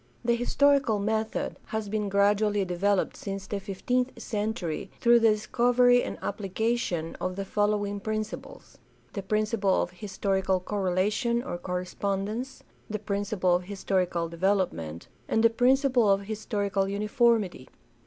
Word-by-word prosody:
— - - -26
The 235 - +3
historical 270 -1 +3
method 220 +2 -2
has 220 -1 -3
been 210 0 -2
gradually 205 0 +2
developed 185 +2 0
since 195 -1 -5
the 200 +1 -3
fifteenth 245 +6 -2
century 210 -6 -3
through 240 -1 +6
the 225 -1 +5
discovery 245 +3 +3
and - - -4
application 200 -4 -2
of 185 0 -2
the 195 0 -4
following 205 0 0
prin 215 +1 -1
ciples: 215 - -11 0.4
the 200 - -3
principle 210 -1 +1
of 175 - -1
historical 190 0 -1
correlation 205 +5 0
or 175 -10 -5
correspondence; 195 +7 -3 0.3
the 215 - -2
principle 200 -3 0
of 180 0 0
historical 185 -3 -1
development; 170 - -1 0.2
and 225 - +1
the 230 - +6
principle 255 -1 +3
of 195 0 +3
historical 205 -2 -2
uniformity. 210 - +1
205 Hz, 135 wpm, -27 LUFS, 190-220 Hz, 0.4 s, through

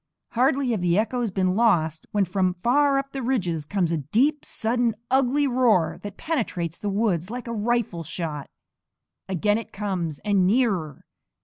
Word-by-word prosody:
Hardly 265 +1 +2
have 215 -5 -1
the 175 0 +2
echoes 230 +2 0
been 185 -1 0
lost 165 -9 +2
when 205 -2 +1
from 185 0 0
far 275 +8 +3
up 275 0 -3
the 270 - -4
ridges 180 - -1
comes 185 -3 0
a 165 - +1
deep, 250 - +1
sudden, 235 0 0 0.2
ugly 270 +2 +3
roar 240 -10 +2
that 205 -1 -8
penetrates 210 - -2
the 205 - -2
woods 195 -4 0
like 245 +2 -5
a 235 - -4
rifle 220 -5 -1
shot. 155 -3 -5 0.8
Again 205 +4 +1
it 230 - -10
comes, 185 -7 -3
and 200 -3 +3
nearer! 195 - 0
210 Hz, 165 wpm, -24 LUFS, 175-245 Hz, 0.8 s, far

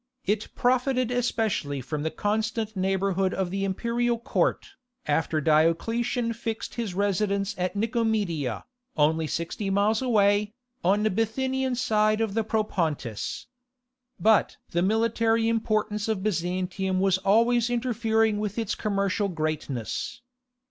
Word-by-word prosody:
It 210 +2 0
profited 255 0 +1
especially 220 - 0
from 145 +4 -4
the 160 - -1
constant 215 +3 -2
neighbourhood 190 0 0
of 190 -2 -1
the 195 +1 -2
imperial 235 +5 0
court, 235 +4 0 0.4
after 160 -1 +1
Diocletian 225 - +1
fixed 225 0 -5
his 225 -7 -4
residence 200 +1 0
at 180 +1 -2
Nicomedia, 210 - -1 0.3
only 155 +1 +2
sixty 170 +6 -3
miles 205 +3 +2
away, 205 -3 +2 0.3
on 200 +4 +3
the 215 - +2
Bithynian 260 +5 0
side 215 -3 +2
of 220 -3 0
the 225 +1 +1
Propontis. 170 - -2 0.7
But 220 0 +3
the 170 - +1
military 225 +2 +2
importance 215 -2 0
of 215 -4 -1
Byzantium 185 0 -1
was 190 -1 +2
always 230 +4 +3
interfering 225 -3 +1
with 210 0 -3
its 225 -3 -1
commercial 200 -1 0
greatness. 155 - -3
210 Hz, 120 wpm, -26 LUFS, 185-225 Hz, 0.7 s, on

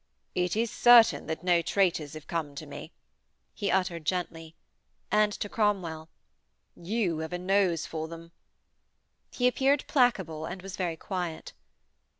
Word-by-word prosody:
'It 180 0 0
is 230 +1 0
certain 240 -2 +6
that 160 +1 -4
no 175 -2 +3
traitors 170 -5 0
have 155 -1 -9
come 155 -4 -4
to 155 - -7
me,' 145 +3 -9 0.6
he 200 -3 -2
uttered 180 -3 0
gently; 165 -1 -3 0.6
and 210 0 +3
to 205 - -4
Cromwell: 185 -8 -1 0.7
'You 180 -3 -1
have 160 +2 -5
a - - -1
nose 180 -2 +1
for 160 -1 -5
them.' 165 0 -11 1.0
He 250 - +1
appeared 270 +3 +2
placable 190 - +1
and 180 0 -7
was 195 -1 -7
very 175 -3 -2
quiet. 175 -3 -5
180 Hz, 145 wpm, -28 LUFS, 160-205 Hz, 1.0 s, certain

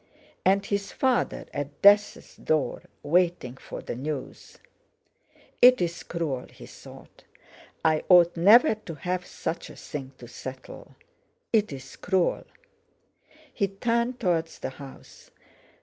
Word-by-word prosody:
And 195 +1 +3
his 200 -1 -2
father—at 150 - -2
death's 205 +1 +4
door, 155 -3 -1 0.2
waiting 170 -5 +1
for - - -9
the - - -5
news! 140 +2 -6 1.0
"It's 180 -9 +5
cruel!" 150 -7 -4
he - - -13
thought; - - -15 0.6
"I 155 -1 +2
ought 175 -2 +6
never 215 - +6
to 210 -7 -9
have 180 +4 -3
such 170 - -5
a - - -12
thing 135 -3 -8
to 120 - -12
settle! 130 +2 -10 0.6
It's 140 -12 -1
cruel!" 185 -2 0 1.1
He 200 - 0
turned 235 +5 -1
towards 165 -5 -1
the - - -5
house. 135 0 -13
175 Hz, 115 wpm, -26 LUFS, 145-200 Hz, 1.1 s, ought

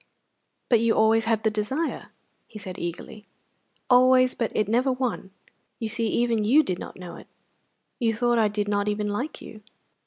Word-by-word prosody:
"But 235 - +4
you 230 0 +2
always 220 +1 +3
had 225 -1 0
the 220 - +2
desire!" 240 +10 -3 0.4
he 215 - -11
said 190 -2 -8
eagerly. 205 +5 -7 0.6
"Always, 255 0 +5
but 230 - -2
it 215 - +1
never 245 +5 +2
won. 255 -6 -3 0.5
You 225 - -4
see, 230 +1 -1
even 230 -1 +1
you 275 +9 +5
did 185 -10 -3
not - - -9
know 180 -2 -9
of - - -10
it. - - -15 0.7
You 225 -3 +1
thought 240 +1 +1
I 220 - +4
did 205 0 -2
not 205 0 0
even 210 0 -1
like 245 +9 -4
you! 215 - -11
225 Hz, 185 wpm, -25 LUFS, 210-245 Hz, 0.7 s, Always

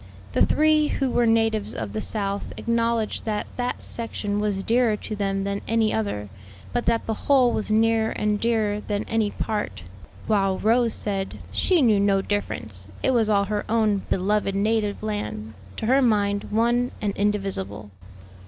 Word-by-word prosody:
The - - +3
three 305 0 +3
who 270 -3 -1
were 240 -1 +2
natives 225 -2 +1
of 105 -3 -5
the 110 - -2
South 200 - -3
acknowledged 230 -1 0
that 215 -2 -1
that 245 0 -2
section 210 -3 -3
was 205 -2 -1
dearer 230 -1 +2
to 215 - -6
them 195 -1 -1
than 200 0 -2
any 225 -1 +2
other, 155 - -2 0.5
but 240 - -1
that 230 -1 +2
the 225 - -1 0.2
whole 260 -4 +5
was 215 - -2
nearer 220 +1 +3
and 210 -1 -1
dearer 215 -3 +1
than 205 -1 -2
any 225 -2 0
part; 210 - -3 0.4
while 195 -3 +2
Rose 230 +1 +2
said 195 -2 -3
"she 355 -6 +2
knew 215 -4 +4
no 200 -1 +3
difference; 110 - -3 0.2
it - - +3
was 230 -4 +2
all 200 -1 +3
her 210 +1 -2
own 220 -2 +2
beloved 195 +1 +1
native 210 0 0
land, 110 - -4 0.2
to - - -3
her 265 +4 +4
mind 205 -4 +2
one 240 +3 +2
and 205 -2 -2
indivisible." 195 - -2
210 Hz, 165 wpm, -24 LUFS, 200-230 Hz, 0.5 s, whole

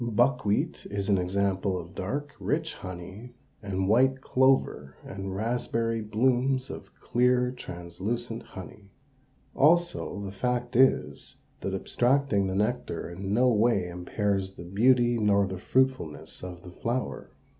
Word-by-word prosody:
Buckwheat 120 -2 +1
is 100 0 -3
an 100 -2 +4
example 95 +1 0
of 85 +2 -10
dark, 145 +11 -4
rich 160 +2 -1
honey 95 +6 -9 0.3
and 95 -2 -2
white 130 +5 +4
clover 130 - +2
and 95 0 -6
raspberry 115 +1 -1
blooms 130 +4 +1
of - - -9
clear, 125 0 +2
translucent 115 +3 -5
honey. 100 +1 -11 0.7
Also 170 -6 +2
the 95 - -5
fact 120 +4 -2
is, 130 +2 +2 0.2
that 95 0 -3
abstracting 120 -1 +1
the 95 - -2
nectar 105 -5 -1
in 95 +3 -5
no 125 +4 +4
wise 105 -5 +2
impairs 95 +2 -2
the 85 - -9
beauty 120 +5 +3
nor 100 -2 +3
the 95 -1 -5
fruitfulness 130 - -1
of 90 -1 -8
the 90 - -10
flower. 90 - -3
105 Hz, 130 wpm, -28 LUFS, 95-125 Hz, 0.7 s, an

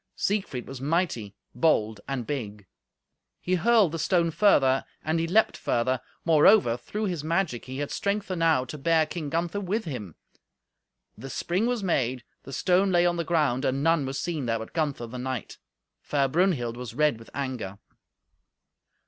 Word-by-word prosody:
Siegfried 190 - -2
was 135 -1 -8
mighty, 140 - -1 0.2
bold 110 -6 +1
and 135 -4 -3
big. 105 -8 -5 0.7
He 180 - -2
hurled 200 0 +4
the 165 - -4
stone 170 +1 +2
further, 145 -7 +4 0.2
and 160 +1 0
he 165 - 0
leaped 215 +6 +3
further; 125 +2 0 0.2
moreover, 155 - +5
through 210 - -4
his 175 -6 -3
magic, 165 -6 -1
he 130 +1 -7
had 145 0 -3
strength 200 0 -2
enow 165 -7 +2
to 150 +4 -8
bear 160 +2 +3
King 155 -1 -5
Gunther 170 +5 -1
with 205 +3 -2
him. 110 - -6 1.0
The 135 - -9
spring 185 - -1
was 245 -4 -1
made, 130 -8 0 0.2
the - - -11
stone 185 +7 +2
lay 175 -1 +4
on 175 0 +1
the 170 - 0
ground, 150 -6 +1
and 135 +1 0
none 165 -4 +2
was 135 +1 -3
seen 160 -7 -3
there 115 0 +1
but 110 0 -8
Gunther, 145 -7 -1
the 125 +2 -7
knight. 130 -2 -5 0.4
Fair 140 -2 +1
Brunhild 135 -7 +1
was 125 -1 -7
red 150 -5 +2
with 115 - -14
anger. 125 -8 -4
150 Hz, 170 wpm, -27 LUFS, 125-175 Hz, 1.0 s, moreover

